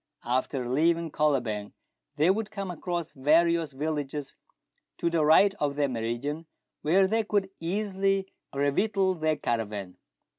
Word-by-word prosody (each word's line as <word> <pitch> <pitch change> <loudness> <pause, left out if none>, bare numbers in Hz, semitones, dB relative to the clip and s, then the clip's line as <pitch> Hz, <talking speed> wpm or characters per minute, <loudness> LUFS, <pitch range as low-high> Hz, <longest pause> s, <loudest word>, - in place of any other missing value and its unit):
After 125 +1 -1
leaving 165 +5 +1
Kolobeng 125 -10 0 0.4
they 155 +4 +4
would 210 +1 -2
come 200 -3 -5
across 175 -1 -4
various 160 +3 +3
villages 145 0 -4 0.6
to 170 - 0
the 165 -2 +2
right 175 +6 +6
of 145 -1 0
their 145 -1 +1
meridian, 125 +7 -3 0.3
where 185 +6 +4
they 220 +4 +1
could 200 -2 0
easily 195 +2 0 0.2
revictual 190 +8 +1
their 155 -2 0
caravan. 105 -8 -3
155 Hz, 125 wpm, -28 LUFS, 140-190 Hz, 0.6 s, right